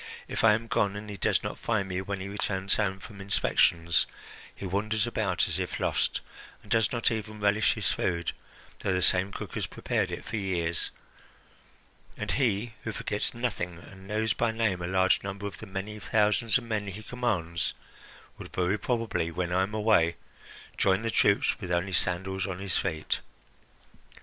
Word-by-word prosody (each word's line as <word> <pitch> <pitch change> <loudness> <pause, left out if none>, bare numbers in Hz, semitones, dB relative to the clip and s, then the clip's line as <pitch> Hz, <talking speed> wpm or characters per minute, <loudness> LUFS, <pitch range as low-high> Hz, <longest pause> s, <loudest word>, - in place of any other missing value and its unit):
If - - -2
I 110 -2 +7
am 115 +1 -4
gone 100 -3 +1
and 105 0 -6
he 100 - -6
does - - +2
not - - -4
find 110 -4 0
me 90 0 -2
when 100 0 -4
he 95 - -4
returns 100 -1 0
home 95 -3 +1
from 105 0 -10
inspections, 85 -4 +3 0.5
he - - -7
wanders 105 +4 0
about 105 -6 +1
as - - -2
if - - -3
lost, - - +1 0.4
and 100 - -17
does 115 -1 +4
not 120 -1 +2
even 110 -1 -4
relish 105 +1 +3
his - - 0
food, 85 -1 0 0.5
though 95 - 0
the 90 -1 +2
same 95 +1 +5
cook - - -6
has - - -2
prepared - - -1
it - - -6
for 110 - -3
years. 85 -4 -1 1.3
And - - -2
he, 115 -3 +1
who 115 - -2
forgets 105 +1 -2
nothing 105 -8 -2
and 95 +3 -13
knows 110 +2 +1
by 115 - +1
name 110 -5 0
a 85 - -2
large 95 +1 +3
number 100 +1 -5
of 100 - -5
the 110 - -8
many 100 +2 -5
thousand 105 +2 +3
men 110 -3 -1
he 100 +2 -6
commands, 95 -11 -1 0.6
would - - -9
very 95 +3 +1
probably, 115 -9 0
when 90 +1 -2
I 90 +1 +3
am 100 +3 -1
away, 105 -6 +4 0.6
join 95 +2 +3
the 115 - 0
troops 100 -2 +3
with 90 -4 -5
only 90 +2 0
sandals 95 +2 0
on 95 -2 -3
his 95 -2 -1
feet. 80 -1 0
100 Hz, 180 wpm, -29 LUFS, 95-110 Hz, 1.3 s, I